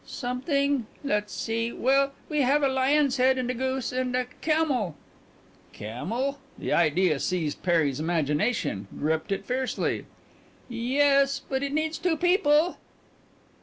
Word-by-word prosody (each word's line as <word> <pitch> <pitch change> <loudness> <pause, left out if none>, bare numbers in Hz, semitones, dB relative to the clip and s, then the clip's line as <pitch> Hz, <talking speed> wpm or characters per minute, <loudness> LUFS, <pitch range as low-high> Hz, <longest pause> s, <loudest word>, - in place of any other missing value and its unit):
"Something 275 0 -1 0.2
let's 210 -6 -1
see. 230 +1 -2
Well, 275 +3 +2
we 300 -1 0
have 280 +3 +3
a - - +5
lion's 270 +1 +2
head, 260 +1 +4
and 250 -1 -1
a - - -2
goose, 260 0 -2
and 250 0 -1
a 255 0 +1 0.2
camel 285 - +1 0.4
" - - -30
"Camel?" 230 - -3 0.2
The - - -2
idea 165 -1 +3
seized 165 -4 -2
Perry's 160 -6 +1
imagination, 155 - 0
gripped 160 +4 -1
it 195 - -2
fiercely. 255 +1 -2 0.6
"Yes, 275 +3 +2
but 265 0 -1
it 280 0 -2
needs 315 +1 -1
two 345 -3 +1
people." 350 -2 +3
255 Hz, 135 wpm, -26 LUFS, 195-280 Hz, 0.6 s, a